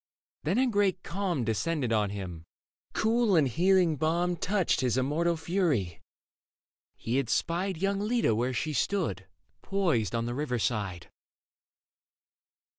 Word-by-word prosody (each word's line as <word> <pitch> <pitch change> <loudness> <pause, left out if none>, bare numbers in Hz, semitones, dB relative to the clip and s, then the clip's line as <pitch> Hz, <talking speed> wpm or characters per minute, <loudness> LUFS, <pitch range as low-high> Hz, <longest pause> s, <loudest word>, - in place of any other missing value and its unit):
Then 180 +8 +1
a 260 - +4
great 205 -6 +1
calm 180 -7 -2
Descended 115 +4 -1
on 105 -2 +2
him: 90 -5 -6 0.5
cool 225 -2 +2
and 155 -4 +4
healing 175 - +3
balm 170 +3 +1
Touched 185 -1 0
his 125 -1 +1
immortal 160 +6 +1
fury. 160 - -1 0.9
He 120 +3 -2
had 135 -4 0
spied 180 +2 0
Young 195 +3 0
Leda 220 - +1
where 120 +4 0
she 140 +5 -2
stood, 125 - -1 0.3
poised 160 - 0
on 115 0 -1
the 120 - -3
river 135 -2 -2
side. 100 -6 -2
155 Hz, 130 wpm, -29 LUFS, 115-190 Hz, 0.9 s, a